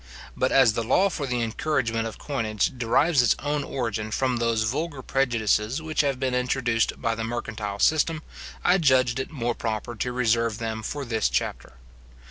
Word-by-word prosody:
But 130 Hz, -, +1 dB
as 130 Hz, -5 st, +5 dB
the 115 Hz, -, -1 dB
law 190 Hz, -, +3 dB
for 145 Hz, -4 st, -3 dB
the 125 Hz, -2 st, -1 dB
encouragement 115 Hz, -2 st, -1 dB
of 110 Hz, -, -8 dB
coinage 110 Hz, -6 st, -1 dB
derives 130 Hz, +5 st, +3 dB
its 120 Hz, -, +3 dB
origin 130 Hz, -7 st, -2 dB
from 125 Hz, +2 st, 0 dB
those 115 Hz, -1 st, +1 dB
vulgar 140 Hz, +4 st, -3 dB
prejudices 115 Hz, -1 st, +1 dB
which 160 Hz, 0 st, 0 dB
have 140 Hz, -3 st, -1 dB
been 130 Hz, -1 st, -1 dB
introduced 125 Hz, -2 st, 0 dB
by 115 Hz, -2 st, 0 dB
the 115 Hz, 0 st, -4 dB
mercantile 110 Hz, -3 st, -4 dB
system, 155 Hz, +5 st, +2 dB, 0.4 s
I 180 Hz, +2 st, +4 dB
judged 130 Hz, -5 st, +3 dB
it 130 Hz, -, -3 dB
more 120 Hz, -6 st, -2 dB
proper 115 Hz, +1 st, -3 dB
to 125 Hz, +3 st, -2 dB
reserve 115 Hz, -2 st, +1 dB
them 110 Hz, -1 st, -4 dB
for 140 Hz, +6 st, -4 dB
this 110 Hz, -3 st, 0 dB
chapter. -, -, -2 dB
120 Hz, 170 wpm, -25 LUFS, 115-135 Hz, 0.4 s, as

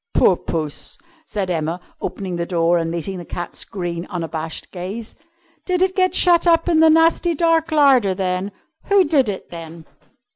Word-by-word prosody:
"Poor 185 Hz, -, +5 dB
Puss!" 155 Hz, -4 st, -5 dB, 0.3 s
said 195 Hz, -3 st, -3 dB
Emma, 165 Hz, +1 st, -2 dB, 0.2 s
opening 190 Hz, -3 st, -4 dB
the 170 Hz, 0 st, -3 dB
door 170 Hz, -1 st, +2 dB
and 165 Hz, 0 st, -2 dB
meeting 170 Hz, +3 st, -4 dB
the -, -, -7 dB
cat's 175 Hz, +1 st, -6 dB
green, 175 Hz, -3 st, -5 dB
unabashed 165 Hz, -3 st, -5 dB
gaze. 195 Hz, +5 st, -6 dB, 0.5 s
"Did 365 Hz, -1 st, +1 dB
it 375 Hz, 0 st, 0 dB
get 370 Hz, -1 st, +2 dB
shut 350 Hz, -1 st, +5 dB
up 330 Hz, 0 st, +4 dB
in 330 Hz, -2 st, +3 dB
the 320 Hz, 0 st, +6 dB
nasty 330 Hz, +2 st, +3 dB
dark 330 Hz, 0 st, +2 dB
larder, 265 Hz, -10 st, +4 dB
then? 185 Hz, +1 st, -2 dB, 0.3 s
Who 400 Hz, -1 st, +4 dB
did 290 Hz, -8 st, +2 dB
it, 195 Hz, -, -6 dB
then?" 165 Hz, -1 st, -9 dB
190 Hz, 170 wpm, -20 LUFS, -, 0.5 s, the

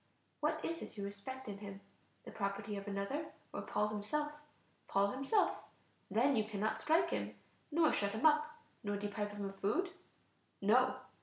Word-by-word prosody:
What 310 Hz, 0 st, +1 dB
is 330 Hz, 0 st, -2 dB
it -, -, -8 dB
you 200 Hz, -, -3 dB
respect 235 Hz, +7 st, -6 dB
in 200 Hz, -1 st, -5 dB
him? 200 Hz, -1 st, -7 dB, 0.5 s
the -, -, -7 dB
property 200 Hz, 0 st, -2 dB
of 200 Hz, 0 st, -5 dB
another, 205 Hz, +10 st, -1 dB, 0.3 s
or -, -, -2 dB
Paul 210 Hz, -, +1 dB
himself? 215 Hz, +9 st, -1 dB, 0.6 s
Paul 200 Hz, +1 st, +3 dB
himself. 275 Hz, +11 st, +3 dB, 0.5 s
Then 245 Hz, +8 st, +4 dB
you 220 Hz, -, +3 dB
cannot 215 Hz, 0 st, -1 dB
strike 335 Hz, +3 st, +3 dB
him, -, -, -2 dB, 0.4 s
nor 320 Hz, 0 st, +5 dB
shut 200 Hz, 0 st, +1 dB
him 220 Hz, +7 st, -1 dB
up, 305 Hz, 0 st, +6 dB, 0.3 s
nor 205 Hz, -1 st, 0 dB
deprive 205 Hz, +1 st, -2 dB
him 205 Hz, -1 st, -4 dB
of 195 Hz, 0 st, -6 dB
food? 360 Hz, -, +1 dB, 0.7 s
No. 250 Hz, +6 st, +5 dB
215 Hz, 165 wpm, -37 LUFS, 200-295 Hz, 0.7 s, up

